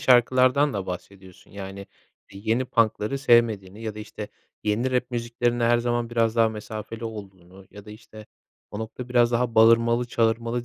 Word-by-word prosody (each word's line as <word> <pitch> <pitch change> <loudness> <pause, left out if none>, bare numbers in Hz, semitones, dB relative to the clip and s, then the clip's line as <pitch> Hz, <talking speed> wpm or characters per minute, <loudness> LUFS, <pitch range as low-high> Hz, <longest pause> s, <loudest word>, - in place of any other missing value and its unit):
şarkılardan 130 +1 +4
da 100 -2 -4
bahsediyorsun. 95 0 -10
Yani, 100 0 -8 0.5
eee, 100 - -10
yeni 115 +4 +1
punk'ları 115 +2 0
sevmediğini 110 -5 +2
ya 110 -2 -4
da, 110 - -9
işte, 105 0 -8 0.4
yeni 115 +5 0
rap 125 0 -1
müziklerinde 120 0 -1
her 120 0 +4
zaman 120 0 -1
biraz 115 -1 +1
daha 115 -1 +4
mesafeli 110 +1 -7
olduğunu 95 -4 -10
ya 105 -1 -12
da, 105 - -12
işte, 110 0 -13 0.4
o 105 - -6
nokta 115 +3 -7
biraz 120 -1 +3
daha 120 -1 0
bağırmalı 115 +2 +5
çağırmalı 115 +1 0
115 Hz, 165 wpm, -24 LUFS, 105-120 Hz, 0.5 s, bağırmalı